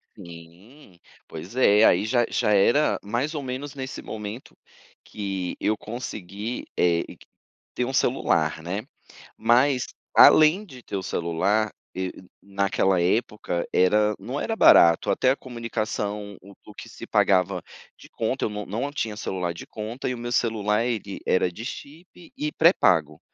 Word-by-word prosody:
Sim, 90 - -14 0.3
pois 85 +8 -9
é, 105 -4 +5
aí - - +4
já 120 +1 +2
já 105 - 0
era 120 +10 +3
mais 125 +10 -2
ou 145 - -3
menos 135 +3 -6
nesse 130 -1 -6
momento 110 +3 -8 0.5
que 95 -3 -4
eu 110 0 0
consegui, 110 -1 -6
eh, 85 -1 +2
e - - -12 0.6
ter 125 - 0
um 130 - -4
celular, 80 - +1
né, 95 +5 -4 0.5
mas 125 +3 +3 0.3
além 155 +7 +7
de 130 -6 -13
ter 100 - -5
o 95 - -3
celular 95 +5 0 0.2
e 95 0 -3 0.3
naquela 100 -2 0
época 95 -2 -1
era 105 +3 +3
não 135 +4 -5
era 225 - -2
barato 85 - +6
até 130 - +2
a 135 - +1
comunicação, 110 -4 -4
o 100 +1 -14
o - - -13
que - - -10
se - - -10
pagava 90 -1 +2 0.4
de - - -15
conta, 120 +4 -2
eu - - -1
não 105 0 -6
não 115 +8 -3
tinha 110 -7 -3
celular 90 -4 -3
de - - -10
conta 115 +5 -6
e 125 - -2
o - - -8
meu 120 0 -5
celular 110 -2 +1
ele 110 -5 -4
era 90 -1 +2
de 110 +7 -9
chip 155 +7 -9 0.2
e 150 0 -3
pré-pago, 80 - +3
105 Hz, 155 wpm, -24 LUFS, 95-125 Hz, 0.6 s, além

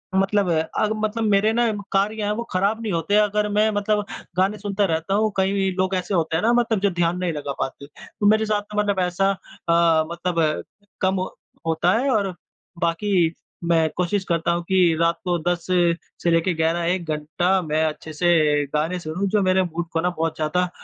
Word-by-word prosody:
मतलब 195 0 +2
अब 160 +6 0
मतलब 220 +1 -1
मेरे 205 +2 +3
ना 235 0 +2 0.2
कार्य 210 +2 0
हैं 205 - 0
वो 235 - -2
ख़राब 200 +5 0
नहीं 220 -2 -3
होते 170 +5 0
अगर 210 0 +2
मैं 210 +1 +2
मतलब 210 0 0 0.3
गाने 195 +3 +2
सुनता 205 -1 -1
रहता 165 +1 -1
हूँ। 215 +1 +2
कई 195 0 +1
लोग 185 0 +1
ऐसे 185 +2 -2
होते 160 -3 0
हैं 165 - 0
ना 230 - +4
मतलब 235 -3 +2
जो 200 +1 +2
ध्यान 175 0 0
नहीं 180 -2 -1
लगा 145 -2 -4
पाते, 135 +1 -4
तो 155 +7 -8
मेरे 215 +1 +4
साथ 210 -1 0
तो 210 0 -9
मतलब 200 -2 0
ऐसा 180 +2 +1
अ, 170 -3 +1
मतलब 170 -3 -1 0.4
कम 190 0 +1 0.5
होता 165 +2 +2
है 275 +3 0
और 200 -5 +1 0.5
बाकी 170 0 +1 0.4
मैं 165 -2 +3
कोशिश 180 +2 0
करता 170 0 +1
हूँ 170 0 -1
कि 180 -3 +4
रात 170 0 +2
को 175 -2 0
10 175 -1 -2 0.6
से 170 - +2
लेके 165 +2 +2
11, 165 +1 0
1 180 +1 0
घंटा 175 +5 0
मैं 155 -1 0
अच्छे 155 0 -5
से 155 -3 +3
गाने 160 +4 0
सुनूँ 170 +4 -3
जो 210 +1 +2
मेरे 185 0 +3
मूड 170 -1 -4
को 165 - +1
ना 180 - +1
बहुत 165 0 -1
ज़्यादा 180 +4 0
185 Hz, 195 wpm, -22 LUFS, 165-205 Hz, 0.6 s, ना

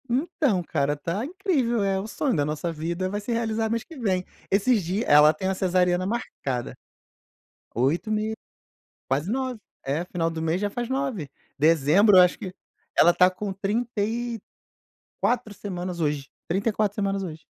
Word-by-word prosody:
Então, 260 - +1
cara, 145 -2 0
tá 170 +8 -3
incrível, 290 - 0
eh, 195 -1 +1
o 200 - -5
sonho 260 +2 -1
da 145 - +2
nossa 155 +3 -2
vida 170 +4 -3
vai 205 +2 -3
se 210 - -4
realizar 225 -1 0
mês 230 0 -1
que 325 - -13
vem. 190 -7 0 0.2
Esses 205 +2 +3
dias 190 +7 -1
ela 150 +1 +7
tem 190 +5 -3
uma 190 - 0
cesariana 180 -1 +2
marcada 135 - -3 1.0
8 135 - +1
e - - +1
meio, 215 +1 -1 0.8
quase 145 +9 0
9. 255 -2 -2 0.3
É, 145 +5 -1
final 170 -2 -1
do 165 -1 -5
mês 160 +2 0
já 205 - 0
faz 240 +3 -4
9. 260 - -2 0.3
Dezembro, 165 +7 +5
eu - - +10
acho 180 -1 +4
que 185 -4 -7 0.4
ela 175 - +7
está 180 +1 +5
com 195 +2 -5
30 210 +3 -2
e 235 +2 -2 0.8
4 235 -4 0
semanas 180 -3 -5
hoje, 145 -3 -1 0.2
34 205 +2 0
semanas 195 -2 -1
hoje. 160 -4 -7
195 Hz, 170 wpm, -25 LUFS, 165-225 Hz, 1.0 s, eu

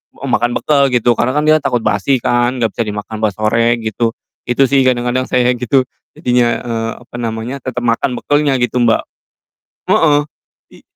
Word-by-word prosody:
makan 120 -2 -1
bekal 140 -2 +2
gitu, 120 -1 +2
karena 125 +2 +1
kan 150 - +1
dia 155 0 +6
takut 120 -4 -1
basi 115 +7 +1
kan 120 +1 +1
gak 110 - +1
bisa 115 - -1
dimakan 105 +1 -5
pas 105 -3 +1
sore 115 +2 +2
gitu. 110 +1 -1 0.4
Itu 130 +3 +3
sih 135 -1 +3
kadang-kadang 125 +1 0
saya 125 0 +2
gitu 130 +2 +2 0.3
jadinya, 125 -1 +2 0.2
eee, 115 -1 -3
apa 120 - -14
namanya, 115 +4 -4
tetep 125 -1 -4
makan 120 +2 0
bekalnya 145 -1 +1
gitu, 125 0 0
Mbak. 115 -2 +3 0.9
Heeh, 145 -2 +4 0.5
i - - -17
120 Hz, 170 wpm, -15 LUFS, 115-130 Hz, 0.9 s, dia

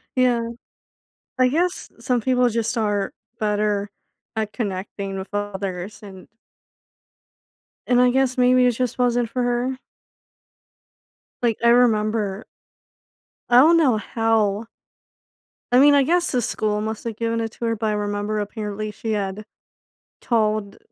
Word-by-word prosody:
Yeah. 245 -2 +2 0.9
I 255 - +5
guess 350 +5 -1
some 245 -1 0
people 250 -1 +2
just 230 +1 -1
are 205 -3 -1 0.3
better 210 -1 0 0.5
at 215 -1 -2
connecting 195 -2 -4
with 190 - -7
others 200 -1 -4
and 190 -2 -11 1.6
and 245 0 +4
I 250 - +5
guess 260 0 +1
maybe 250 0 +4
it 250 - +4
just 245 0 -2
wasn't 245 -2 +1
for 250 +2 -2
her. 245 +2 -1 1.6
Like, 230 -3 +1
I 235 - +6
remember 215 -3 +2 1.0
I 240 - +5
don't 320 +6 +7
know 265 -9 +3
how 220 -1 0 1.1
I 250 - +6
mean, 290 +2 +7
I 280 -1 +5
guess 345 +5 +2
the 250 -2 +1
school 210 -1 -1
must 220 0 -4
have 230 -2 -3
given 230 +1 -1
it 225 - -3
to 235 - -5
her, 230 0 0
but 220 0 -2
I 215 - +1
remember 205 +1 -2
apparently 210 0 -4
she 225 +1 -5
had 205 0 -3 0.8
told, 215 -3 0
225 Hz, 140 wpm, -22 LUFS, 210-245 Hz, 1.6 s, don't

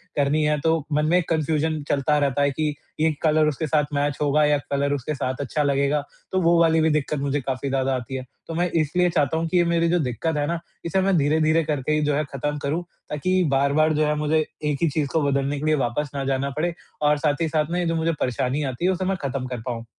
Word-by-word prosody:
करनी 145 +2 +2
है 150 0 +1
तो 160 +2 +2 0.2
मन 150 +1 +2
में 175 - +4
एक 180 - -1
कन्फ़्यूजन 155 -1 0
चलता 145 +1 +2
रहता 140 -1 +1
है 140 0 +3
कि 150 +1 -1 0.3
ये 160 +1 +3
कलर 155 -1 +3
उसके 150 +1 -1
साथ 150 0 +2
मैच 145 0 0
होगा 150 +1 +3
या 150 0 +3
कलर 140 0 +1
उसके 145 +2 -3
साथ 130 -1 -2
अच्छा 145 +2 -1
लगेगा 140 +1 +1 0.3
तो 185 - +1
वो 170 0 +4
वाली 160 -1 +4
भी 160 - +3
दिक्कत 150 -1 0
मुझे 140 +1 -1
काफ़ी 135 +1 -3
ज़्यादा 135 0 0
आती 125 +1 -5
है। 130 - -4 0.2
तो 165 - -5
मैं 175 +2 +1
इसलिए 180 +4 +1
चाहता 160 -2 +1
हूँ 165 - -1
कि 180 - +1
ये 175 - +5
मेरी 170 0 +2
जो 175 +1 +2
दिक्कत 150 +3 -2
है 145 - +1
ना 170 +1 -1 0.3
इसे 180 +3 +1
मैं 195 0 +2
धीरे-धीरे 155 +2 +2
करके 150 -2 -2
ही 150 - +2
जो 145 - +1
है 150 - +1
ख़त्म 145 +2 -2
करूँ 155 +5 -1 0.3
ताकि 185 +5 +1
बार-बार 140 +3 +3
जो 155 0 +2
है 150 0 +1
मुझे 155 +1 +1 0.2
एक 150 -1 0
ही 165 - +3
चीज़ 145 0 -1
को 160 - +2
बदलने 140 +1 0
के 150 - -4
लिए 155 0 +3
वापस 145 +5 -2
ना 140 - -2
जाना 135 +1 0
पड़े 170 +2 0 0.3
और 150 0 +3
साथ 145 +1 0
ही 165 - +2
साथ 155 -1 0
में 175 - 0
ये 175 - 0
जो 165 0 0
मुझे 165 +1 +1
परेशानी 130 +3 0
आती 130 +8 -3
है 185 - +4
उसे 185 0 -2
मैं 195 +1 0
ख़त्म 135 -2 -3
कर 125 -2 -5
पाऊँ। 115 -1 -5
150 Hz, 260 wpm, -23 LUFS, 140-160 Hz, 0.3 s, ये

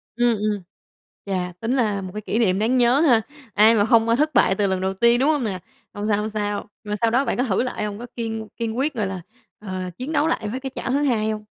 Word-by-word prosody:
Ừm, 240 -1 +3
ừm. 210 -1 -1 0.6
Chà, 180 -2 -2
tính 230 +5 -1
là 210 -6 +1
một 185 -1 -7
cái 210 - -5
kỷ 215 +2 -2
niệm 195 -5 +2
đáng 235 +4 +2
nhớ 245 +2 +4
ha, 260 -8 +4 0.3
ai 215 +3 +6
mà 205 - +4
hông, 230 0 +3
ơ, 230 - +4
thất 300 +4 +1
bại 215 -6 +4
từ 200 0 +1
lần 190 -1 -1
đầu 190 0 -1
tiên, 235 +5 +3
đúng 275 +4 +3
hông 295 -4 +1
nè? 195 -5 -3 0.3
Hông 205 +1 -4
sao, 210 -2 +2
hông 210 +1 -2
sao. 205 -1 -3
Mà 210 -1 -3
sau 225 +1 +1
đó 260 +4 +2
bạn - - -1
có 250 - +2
thử 225 -3 +1
lại 250 -4 -3
hông? 205 0 -5
Có 240 - -6
kiên 225 -2 -4
kiên 230 0 -3
quyết, 290 +4 0
gọi 215 -5 -1
là, 190 -1 -5 0.4
à, 185 -3 -5
chiến 260 +5 -5
đấu 305 0 +2
lại 220 -8 -1
với 250 +5 -4
cái 265 0 -5
chảo - - -3
thứ 270 - +2
2 220 -6 +1
hông? 215 0 -5
220 Hz, 275 wpm, -22 LUFS, 205-245 Hz, 0.6 s, ai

